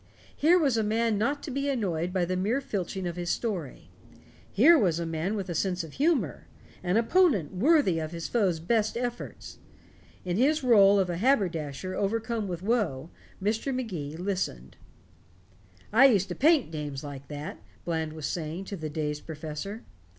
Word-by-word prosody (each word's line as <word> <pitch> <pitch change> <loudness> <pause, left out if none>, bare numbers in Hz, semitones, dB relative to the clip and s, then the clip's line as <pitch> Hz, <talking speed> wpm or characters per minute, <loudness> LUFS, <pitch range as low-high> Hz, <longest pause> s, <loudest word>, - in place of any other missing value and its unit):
Here 330 +5 +5
was 280 -9 +2
a 220 - +2
man 220 0 +1
not 280 +6 0
to 285 - -5
be 275 +2 -1
annoyed 180 - -1
by 180 -1 +1
the 185 +1 -2
mere 210 +8 0
filching 190 -6 -4
of 175 0 -4
his 175 0 -3
story. 185 - -3 0.6
Here 290 - +7
was 185 - +2
a 170 - -2
man 165 +5 -2
with 195 -3 -3
a 175 - -3
sense 180 +1 -1
of 160 - -10
humor 270 - 0 0.3
an 180 +3 +1
opponent 230 - +3
worthy 225 - +3
his 165 +1 -4
foe's 195 -8 +1
best 215 +6 0
efforts. 240 0 -5 0.7
In 180 0 -1
his 300 +6 +3
rôle 205 -6 +6
of 185 -2 +1
a 170 - -3
haberdasher 185 - 0
overcome 220 +2 -1
with 175 -1 -5
woe, 190 - -1 0.3
Mr. 220 +7 -1
Magee 170 - -4
listened. 180 - -3 1.2
"I 260 +5 +8
used 200 -7 +2
to - - -2
paint 300 - +3
dames 150 -3 -5
like 140 -2 -8
that," 145 +1 -7 0.2
Bland 160 -2 -2
was 155 -2 -6
saying 160 +4 -4
to 200 - -5
the 155 -4 -5
dazed 150 -1 -4
professor. 160 +7 -6
190 Hz, 170 wpm, -28 LUFS, 165-230 Hz, 1.2 s, I